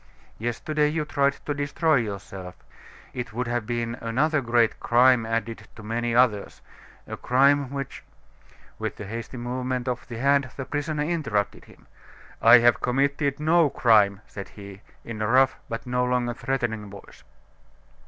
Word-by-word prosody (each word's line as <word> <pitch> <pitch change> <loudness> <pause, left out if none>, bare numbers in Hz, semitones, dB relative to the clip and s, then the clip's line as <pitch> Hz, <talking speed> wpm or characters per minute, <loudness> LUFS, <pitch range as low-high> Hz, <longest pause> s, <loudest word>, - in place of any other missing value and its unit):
Yesterday 150 +7 0
you 155 0 -1
tried 140 -1 +1
to 145 - -1
destroy 145 +2 +1
yourself. 95 -4 -5 0.6
It 125 -3 -5
would 125 +2 -2
have 120 -2 -2
been 120 -1 -2
another 140 +7 +1
great 115 -2 +2
crime 120 -1 +4
added 115 0 -3
to 110 - -11
many 115 +2 -2
others 120 -5 +1 0.4
a - - -6
crime 140 +2 +3
which 140 -1 -6 0.4
" - - -27
With - - -4
a 105 - -6
hasty 115 +5 -7
movement 125 +1 -3
of 125 -1 -3
the 120 - -7
hand, 140 +1 +2
the 135 - -4
prisoner 150 +1 -2
interrupted 140 - -2
him. - - -19 0.6
"I - - +9
have 120 0 +3
committed 140 +2 0
no 160 0 +3
crime," 105 -6 +3
said 100 -1 -9
he, 100 -1 -12 0.2
in 110 -2 -6
a 105 - 0
rough, 130 +2 +3
but 115 - -5
no 125 0 0
longer 125 -1 0
threatening 120 -5 -3
voice. 100 0 -14
125 Hz, 155 wpm, -25 LUFS, 115-140 Hz, 0.6 s, I